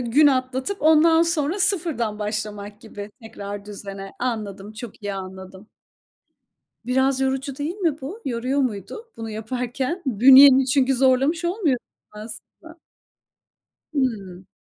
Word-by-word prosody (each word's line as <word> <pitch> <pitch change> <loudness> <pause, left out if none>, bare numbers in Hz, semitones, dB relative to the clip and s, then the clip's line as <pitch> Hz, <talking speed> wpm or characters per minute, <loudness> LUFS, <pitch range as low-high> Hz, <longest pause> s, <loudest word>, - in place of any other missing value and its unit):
gün 250 +5 +4
atlatıp 260 +6 0
ondan 320 +1 +5
sonra 335 +1 0
sıfırdan 325 - 0
başlamak 210 -1 -5
gibi 210 -2 -9
tekrar 205 -2 -8
düzene. 195 -1 -8
Anladım, 210 -4 -4
çok 225 0 -10
iyi 205 -1 -3
anladım. 190 +1 -9 1.2
Biraz 265 +1 +1
yorucu 265 0 -2
değil 300 +4 -3
mi 330 -7 -1
bu? 335 - -7
Yoruyor 255 +3 -1
muydu 255 - -4
bunu 225 -1 -6
yaparken? 250 - -4
Bünyeni 265 +3 +7
çünkü 270 0 +2
zorlamış 270 +6 +2
olmuyor 345 - 0 0.3
aslında. 230 +10 -11 1.1
Hıı. 200 -10 -2
255 Hz, 115 wpm, -23 LUFS, 210-285 Hz, 1.2 s, Bünyeni